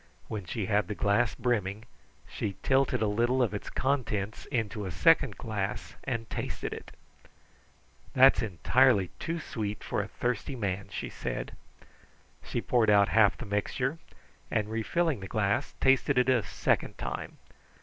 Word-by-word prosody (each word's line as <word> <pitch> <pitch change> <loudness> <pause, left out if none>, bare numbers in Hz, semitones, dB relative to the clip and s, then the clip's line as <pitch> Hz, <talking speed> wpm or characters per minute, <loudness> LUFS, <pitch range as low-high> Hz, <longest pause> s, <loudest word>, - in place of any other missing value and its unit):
When 105 -4 -4
she 100 +4 -3
had 105 -2 +1
the 105 - -4
glass 100 +1 +2
brimming, 110 -3 -1 0.4
she 100 -2 -4
tilted 135 -4 +2
a - - +2
little 120 +5 +2
of 115 - -1
its 105 - -5
contents 115 -7 -1
into 110 -5 -2
a - - -3
second 140 - +3
glass 105 -2 -4
and 115 -3 -2
tasted - - -4
it. - - -9 1.2
"That's 135 +1 +7
entirely 105 - +3
too 165 +1 -3
sweet 105 -8 -4
for - - -1
a 100 - -5
thirsty 125 +5 -2
man," 100 -4 -2
she - - -5
said. - - -5 0.9
She - - -3
poured 120 -3 +2
out 100 -1 +5
half 110 -2 +4
the - - -7
mixture, 125 +9 -1 0.5
and 110 -1 -1
refilling 145 +6 0
the 95 - -7
glass, 105 +5 0
tasted 135 +1 +3
it 125 +1 +4
a 125 -3 +4
second 105 - -1
time. - - -5
110 Hz, 150 wpm, -29 LUFS, 100-130 Hz, 1.2 s, That's